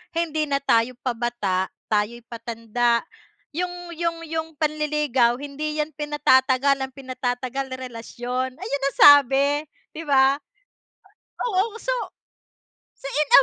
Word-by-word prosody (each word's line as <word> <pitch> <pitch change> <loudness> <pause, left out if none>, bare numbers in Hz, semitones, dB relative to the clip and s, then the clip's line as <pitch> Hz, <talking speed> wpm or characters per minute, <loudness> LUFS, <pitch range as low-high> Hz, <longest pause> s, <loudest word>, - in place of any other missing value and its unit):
"Hindi 315 -2 0
na 280 - +2
tayo 235 -1 +2
pabata 235 -6 -1 0.2
tayo'y 215 +3 0
patanda, 235 0 -1 0.5
yung 355 +2 -4
yung 335 0 -2
yung 320 0 -3
panliligaw 300 -5 +1
hindi 290 +2 -4
'yan 305 - -11
pinatatagal 275 -2 +3
ang 265 0 -4
pinatatagal 255 0 -3
relasyon" 250 +1 -5
ayun 280 -1 -4
ang 275 - -5
sabi 285 +1 +6 0.3
'di 325 - -5
ba. 270 -1 +5 1.1
Oo 425 -1 +1
so, - - -2 1.1
so - - -15
in 295 +1 0
275 Hz, 110 wpm, -23 LUFS, 245-300 Hz, 1.1 s, sabi